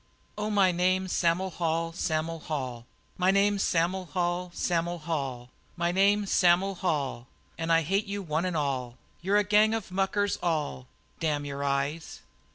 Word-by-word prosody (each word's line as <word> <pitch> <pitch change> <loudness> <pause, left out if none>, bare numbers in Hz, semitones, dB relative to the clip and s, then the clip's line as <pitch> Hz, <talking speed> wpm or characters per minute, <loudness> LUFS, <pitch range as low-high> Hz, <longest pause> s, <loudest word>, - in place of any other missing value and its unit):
"Oh, 210 0 -2
my 200 -3 +4
name's 185 +1 +1
Sam'l 180 +2 +1
Hall 165 -1 -1
Sam'l 165 0 -2
Hall; 130 -7 -5 0.3
My 180 +1 +3
name's 200 +1 +3
Sam'l 180 +2 +1
Hall 175 +2 -1
Sam'l 175 0 -1
Hall. 135 -6 -4 0.3
My 170 0 +1
name 200 +3 +3
is 200 - -5
Sam'l 180 +2 +4
Hall, 140 -9 -2 0.3
And 165 0 -2
I 165 0 +4
hate 195 +7 0
you 200 0 -4
one 160 +1 -1
an' 180 - -2
all, 130 -5 -2 0.2
You're 195 +4 +2
a 210 - +4
gang 210 +2 +4
of 215 -4 -5
muckers 195 +2 0
all 150 - -2 0.3
Damn 150 -2 -1
your 140 0 -4
eyes!" 140 +3 -2
175 Hz, 165 wpm, -28 LUFS, 150-190 Hz, 0.3 s, my